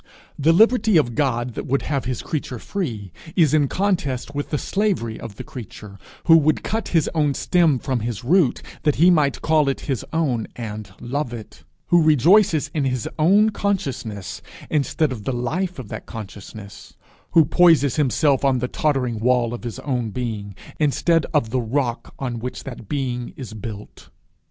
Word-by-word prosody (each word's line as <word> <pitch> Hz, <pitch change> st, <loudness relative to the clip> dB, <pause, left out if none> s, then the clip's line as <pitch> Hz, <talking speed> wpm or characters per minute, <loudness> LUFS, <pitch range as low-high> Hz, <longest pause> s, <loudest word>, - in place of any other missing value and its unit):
The 155 Hz, +3 st, +4 dB
liberty 220 Hz, +1 st, +4 dB
of 145 Hz, -6 st, +3 dB
the -, -, -7 dB
God 120 Hz, -1 st, -1 dB
that -, -, -6 dB
would 140 Hz, +2 st, 0 dB
have 140 Hz, -3 st, -2 dB
his 125 Hz, -2 st, -3 dB
creature 140 Hz, -5 st, -4 dB
free, 115 Hz, -, -4 dB, 0.2 s
is 155 Hz, -5 st, +4 dB
in 150 Hz, -2 st, +4 dB
contest 145 Hz, -8 st, -1 dB
with 145 Hz, 0 st, -3 dB
the 150 Hz, -, 0 dB
slavery 185 Hz, -, -1 dB
of 115 Hz, -4 st, -8 dB
the -, -, -7 dB
creature 105 Hz, -4 st, -10 dB, 0.2 s
who 165 Hz, -1 st, +7 dB
would 155 Hz, -1 st, +2 dB
cut 225 Hz, +1 st, -2 dB
his 165 Hz, -4 st, +2 dB
own 150 Hz, -4 st, +1 dB
stem 170 Hz, -6 st, +3 dB
from 130 Hz, 0 st, -2 dB
his 115 Hz, 0 st, -4 dB
root 160 Hz, +1 st, +2 dB, 0.2 s
that 150 Hz, -2 st, +2 dB
he 175 Hz, +4 st, +5 dB
might 150 Hz, -5 st, +1 dB
call 155 Hz, -3 st, +3 dB
it 135 Hz, -, -3 dB
his 135 Hz, -5 st, -3 dB
own 140 Hz, -9 st, 0 dB
and 105 Hz, -4 st, -6 dB
love 130 Hz, +1 st, -3 dB
it; 110 Hz, -2 st, -11 dB, 0.3 s
who 175 Hz, -1 st, +5 dB
rejoices 155 Hz, -, +4 dB
in 150 Hz, -, 0 dB
his 130 Hz, -3 st, -1 dB
own 200 Hz, +7 st, +5 dB
consciousness, 135 Hz, -, -3 dB, 0.3 s
instead 150 Hz, 0 st, +1 dB
of 115 Hz, -5 st, -6 dB
the 135 Hz, -, -2 dB
life 170 Hz, +10 st, -2 dB
of 115 Hz, -6 st, -8 dB
that -, -, -7 dB
consciousness; 100 Hz, -1 st, -10 dB, 0.4 s
who 165 Hz, -2 st, +6 dB
poises 160 Hz, -4 st, +4 dB
himself 140 Hz, -1 st, +2 dB
on 135 Hz, -2 st, +3 dB
the 125 Hz, 0 st, -1 dB
tottering 125 Hz, -6 st, -1 dB
wall 120 Hz, 0 st, +2 dB
of 120 Hz, -, -7 dB
his 120 Hz, -2 st, -5 dB
own 125 Hz, -5 st, -2 dB
being, 105 Hz, -4 st, -5 dB, 0.2 s
instead 160 Hz, +2 st, +2 dB
of 130 Hz, -8 st, +1 dB
the 130 Hz, 0 st, +1 dB
rock 120 Hz, +1 st, -2 dB
on 125 Hz, -3 st, -4 dB
which 125 Hz, +2 st, -6 dB
that 120 Hz, -6 st, -9 dB
being 125 Hz, -4 st, -3 dB
is 125 Hz, -5 st, -7 dB
built. 105 Hz, -1 st, -9 dB
135 Hz, 180 wpm, -22 LUFS, 120-155 Hz, 0.4 s, who